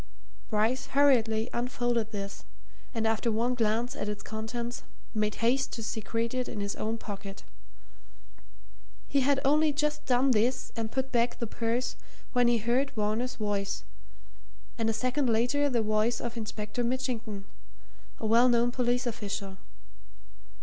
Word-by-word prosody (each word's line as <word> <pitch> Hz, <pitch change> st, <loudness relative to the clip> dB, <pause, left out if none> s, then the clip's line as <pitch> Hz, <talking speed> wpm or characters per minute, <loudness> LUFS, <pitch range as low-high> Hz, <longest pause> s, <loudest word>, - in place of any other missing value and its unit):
Bryce 220 Hz, +4 st, +1 dB
hurriedly 230 Hz, -6 st, +4 dB
unfolded 240 Hz, -2 st, 0 dB
this, 200 Hz, -2 st, -5 dB, 0.5 s
and 225 Hz, -3 st, -1 dB
after 225 Hz, +1 st, +2 dB
one 235 Hz, +3 st, +1 dB
glance 230 Hz, 0 st, 0 dB
at 210 Hz, -, -3 dB
its 210 Hz, -, -4 dB
contents, 235 Hz, +2 st, -4 dB, 0.3 s
made 215 Hz, -1 st, 0 dB
haste 265 Hz, +3 st, +2 dB
to 225 Hz, -, -4 dB
secrete 230 Hz, +2 st, -2 dB
it 255 Hz, -1 st, -1 dB
in 215 Hz, -, -5 dB
his 200 Hz, 0 st, -2 dB
own 220 Hz, +1 st, -2 dB
pocket. 200 Hz, -2 st, -7 dB, 1.6 s
He 280 Hz, -, +2 dB
had 275 Hz, +1 st, +3 dB
only 300 Hz, +2 st, +4 dB
just 300 Hz, +1 st, -1 dB
done 260 Hz, +1 st, +4 dB
this 240 Hz, +3 st, +1 dB
and 225 Hz, -2 st, -3 dB
put 265 Hz, 0 st, -1 dB
back 235 Hz, 0 st, +2 dB
the 235 Hz, -, -2 dB
purse 235 Hz, +3 st, -1 dB, 0.4 s
when 245 Hz, -1 st, +4 dB
he 240 Hz, 0 st, +4 dB
heard 240 Hz, +5 st, +1 dB
Varner's 220 Hz, +4 st, 0 dB
voice, 205 Hz, -2 st, -2 dB, 0.9 s
and 225 Hz, -1 st, 0 dB
a -, -, +3 dB
second 255 Hz, +4 st, 0 dB
later 245 Hz, +6 st, +2 dB
the 235 Hz, -4 st, +1 dB
voice 215 Hz, +2 st, +2 dB
of 235 Hz, 0 st, -4 dB
Inspector 215 Hz, +1 st, -3 dB
Mitchington, 235 Hz, -5 st, -2 dB, 0.7 s
a -, -, -5 dB
well 235 Hz, +3 st, +6 dB
known 240 Hz, 0 st, +3 dB
police 245 Hz, 0 st, +1 dB
official. 200 Hz, -4 st, -4 dB
235 Hz, 145 wpm, -29 LUFS, 220-250 Hz, 1.6 s, well